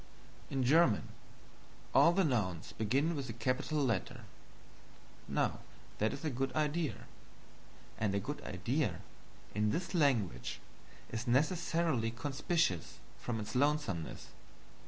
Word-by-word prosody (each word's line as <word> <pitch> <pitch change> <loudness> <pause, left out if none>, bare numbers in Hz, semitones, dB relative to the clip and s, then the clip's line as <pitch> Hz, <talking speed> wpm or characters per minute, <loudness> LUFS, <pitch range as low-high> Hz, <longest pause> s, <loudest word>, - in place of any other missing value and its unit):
In 135 -2 0
German, 135 -3 +4 0.8
all 165 - +7
the 190 +2 +3
Nouns 100 - 0
begin 135 +10 +1
with 135 -3 -4
a - - -3
capital 130 +6 -1
letter. 110 -7 -1 1.1
Now - - 0 0.4
that 110 +1 +2
is 140 +3 -6
a 155 - 0
good 135 +1 -1
idea; 155 -3 0 0.9
and 105 -2 +1
a - - +2
good - - -5
idea, - - -1 0.5
in 105 +1 +2
this 175 - -2
language, 110 - +1 0.5
is 115 +2 -3
necessarily 150 -2 +2
conspicuous 135 - 0 0.2
from 115 -2 -3
its 105 - -5
lonesomeness. 135 - 0
130 Hz, 115 wpm, -34 LUFS, 110-155 Hz, 1.1 s, all